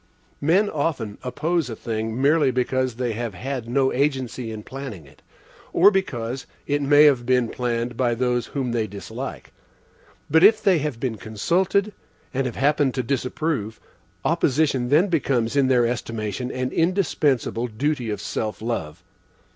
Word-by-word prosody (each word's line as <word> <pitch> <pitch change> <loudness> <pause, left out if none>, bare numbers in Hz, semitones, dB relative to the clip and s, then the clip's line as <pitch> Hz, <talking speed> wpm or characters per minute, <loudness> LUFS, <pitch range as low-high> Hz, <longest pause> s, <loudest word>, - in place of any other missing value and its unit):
Men 180 +8 +3
often 145 - -2
oppose 155 +3 -1
a 115 - -5
thing, 110 +1 -3
merely 145 +1 +4
because 130 0 0
they 120 -1 -2
have 115 -2 -4
had 125 +4 -4
no 130 +1 +2
agency 130 -4 -1
in 110 -1 -7
planning 130 - -8
it, 70 - -20 0.5
or 195 +5 +7
because 130 - -2 0.2
it 145 0 0
may 145 +1 +6
have 140 -5 +5
been 125 -1 +2
planned 120 -1 -2
by 120 -2 +1
those 125 0 0
whom 130 -4 -3
they 115 -2 0
dislike. 100 0 -7 0.7
But 160 +3 +4
if 215 +2 +7
they 195 -6 +3
have 145 -5 -3
been 120 -3 -2
consulted, 180 - 0 0.4
and 135 0 0
have 120 - -5
happened 145 -1 +2
to 130 - -1
disapprove, 125 -2 -2 0.5
opposition 145 -5 +1
then 155 +8 +4
becomes, 135 - 0
in 140 -2 +4
their 125 -2 +4
estimation, 115 0 -3
an 130 0 -2
indispensable 155 - +1
duty 125 +1 -2
of 105 - -3
self 110 -1 -3
love. 85 -8 -4
130 Hz, 155 wpm, -23 LUFS, 115-145 Hz, 0.7 s, or